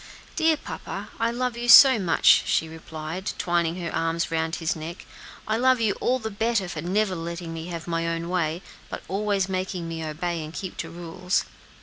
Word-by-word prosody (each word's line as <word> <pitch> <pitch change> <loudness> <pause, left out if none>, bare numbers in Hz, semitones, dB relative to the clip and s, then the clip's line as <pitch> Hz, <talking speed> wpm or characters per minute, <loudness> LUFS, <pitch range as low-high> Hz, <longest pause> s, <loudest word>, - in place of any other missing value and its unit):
"Dear 320 -1 +3
papa, - - -7
I 230 - +2
love 245 0 -2
you 240 0 -3
so 260 -1 +10
much!" 180 -4 +5
she 160 - +1
replied, 160 +2 -6
twining 175 0 0
her 165 - -4
arms 165 +1 -1
around 160 0 0
his 165 -2 -1
neck, 165 +3 -7 0.4
"I 215 +1 +1
love 255 +1 +4
you 220 -3 +2
all 255 - +2
the 220 -3 -5
better 220 -1 0
for 160 -3 -5
never 190 +4 0
letting 170 0 -5
me 165 +1 -6
have 170 -2 -6
my 165 -1 -1
own 165 0 -2
way, 170 -1 -1 0.3
but - - -6
always 200 0 0
making 185 -2 -3
me 165 -1 -5
obey 165 +2 -3
and 155 +2 -9
keep 185 -2 -5
to 165 - -4
rules." 175 +2 -2
175 Hz, 195 wpm, -25 LUFS, 165-210 Hz, 0.4 s, so